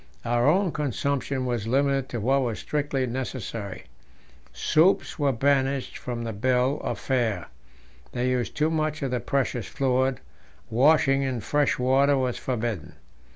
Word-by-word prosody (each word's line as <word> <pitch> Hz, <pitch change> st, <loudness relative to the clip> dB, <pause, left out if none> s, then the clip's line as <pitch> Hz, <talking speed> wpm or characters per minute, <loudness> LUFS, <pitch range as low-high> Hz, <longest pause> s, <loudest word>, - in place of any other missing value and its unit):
Our 120 Hz, +2 st, +2 dB
own 185 Hz, +3 st, +3 dB
consumption 140 Hz, -2 st, -1 dB
was 120 Hz, -3 st, -2 dB
limited 135 Hz, +1 st, +1 dB
to 120 Hz, -, -3 dB
what 135 Hz, +6 st, +2 dB
was 115 Hz, -4 st, -2 dB
strictly 145 Hz, -3 st, -1 dB
necessary; 115 Hz, -5 st, -5 dB, 0.7 s
soups 160 Hz, -, +2 dB
were 145 Hz, -2 st, +3 dB
banished 135 Hz, +1 st, +1 dB
from 120 Hz, -2 st, -5 dB
the 115 Hz, -1 st, -4 dB
bill 130 Hz, +6 st, +1 dB
of -, -, -2 dB
fare, 115 Hz, -, -1 dB, 0.6 s
they 125 Hz, +1 st, 0 dB
used 125 Hz, -2 st, -2 dB
too 155 Hz, +1 st, +2 dB
much 155 Hz, -1 st, -1 dB
of 135 Hz, -, -1 dB
the 125 Hz, -, 0 dB
precious 125 Hz, -3 st, -1 dB
fluid; 130 Hz, 0 st, 0 dB, 0.5 s
washing 135 Hz, +2 st, +4 dB
in 130 Hz, -3 st, -1 dB
fresh 145 Hz, +3 st, +1 dB
water 135 Hz, +3 st, +3 dB
was 130 Hz, -2 st, -1 dB
forbidden. 115 Hz, -, -3 dB
130 Hz, 145 wpm, -26 LUFS, 120-140 Hz, 0.7 s, washing